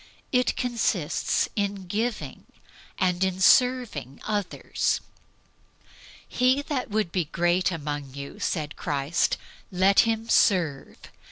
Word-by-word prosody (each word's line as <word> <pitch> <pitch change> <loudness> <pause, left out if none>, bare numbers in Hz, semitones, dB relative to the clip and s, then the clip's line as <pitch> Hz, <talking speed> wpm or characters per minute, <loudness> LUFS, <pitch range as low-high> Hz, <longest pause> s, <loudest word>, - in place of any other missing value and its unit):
It 250 -1 +2
consists 225 - 0
in 200 -2 -2
giving, 215 +5 -3 0.5
and 180 -1 +1
in 190 -1 -1
serving 240 - +3
others. 205 -3 -1 1.3
"He 255 +3 +2
that 275 -5 -3
would 210 -4 -1
be 180 -3 0
great 175 +4 +1
among 145 -4 -5
you," 140 0 -8
said 150 -3 -2
Christ, 145 +2 0 0.3
"let 190 +2 +4
him 225 0 +2
serve." 170 - +2
190 Hz, 105 wpm, -26 LUFS, 160-225 Hz, 1.3 s, let